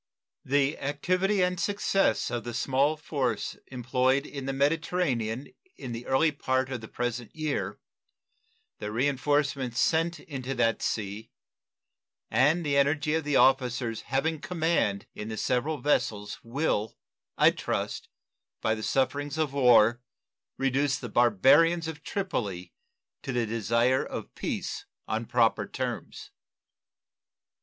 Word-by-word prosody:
The 140 +2 +1
activity 185 +8 +1
and 180 -1 0
success 195 -5 +1
of 120 -2 -2
the 120 -1 -5
small 135 +4 +1
force 140 -5 -2
employed 130 +2 +1
in 140 -3 -7
the - - 0
Mediterranean 140 -4 0 0.2
in 130 - -7
the 115 +1 -6
early 155 +4 +3
part 130 -2 -1
of 125 -3 -4
the 110 - -8
present 120 -1 -4
year, 140 -11 -2 1.0
the 105 - -4
reenforcements 135 0 0
sent 165 +2 +2
into 135 -5 -5
that 115 -2 +1
sea, 105 +1 -3 1.0
and 145 +9 +3
the 140 -1 +1
energy 145 +2 +2
of 160 0 +1
the 145 -1 -1
officers 125 -4 +2
having 150 +4 -1
command 160 - 0
in 105 - -6
the 110 - -5
several 130 +8 0
vessels 110 -7 -1
will, 115 -4 -1 0.4
I - - +6
trust, - - -3 0.5
by 110 - +1
the 110 - -4
sufferings 140 +5 0
of 155 -3 0
war, 120 -3 +5 0.6
reduce 135 +1 +1
the 120 - -7
barbarians 140 - +4
of 160 -2 -6
Tripoli 105 - -3 0.5
to - - -4
the 120 -2 0
desire 115 +3 +1
of - - -7
peace - - -4 0.2
on 110 +1 -2
proper 115 -2 +2
terms. - - -5
135 Hz, 130 wpm, -28 LUFS, 120-150 Hz, 1.0 s, I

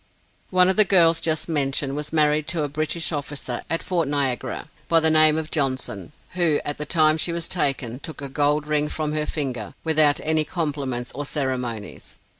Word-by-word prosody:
One 180 -1 +4
of 190 - +1
the 215 - +8
girls 170 -4 +4
just 160 -2 0
mentioned, 140 -3 -1
was 150 0 -4
married 150 -1 +2
to 160 -1 -1
a - - -1
British 155 +3 -2
officer 145 -4 -4
at 165 +1 -1
Fort 170 -5 -1
Niagara, 140 -4 -2 0.2
by 165 - +5
the 160 0 +3
name 155 0 +6
of 160 0 -4
Johnson, 130 - -2 0.2
who 170 -5 +2
at 145 - -3
the 150 - -4
time 155 -1 +4
she 170 - 0
was 170 0 -4
taken, 135 -7 -1
took 160 - -7
a 140 - -5
gold 145 +2 0
ring 150 0 0
from 155 -1 -3
her 155 0 -1
finger, 125 -8 -4
without 155 -2 +3
any 160 0 +2
compliments 140 -7 -3
or 145 +2 -5
ceremonies. 125 -7 -4
150 Hz, 190 wpm, -23 LUFS, 140-160 Hz, 0.2 s, the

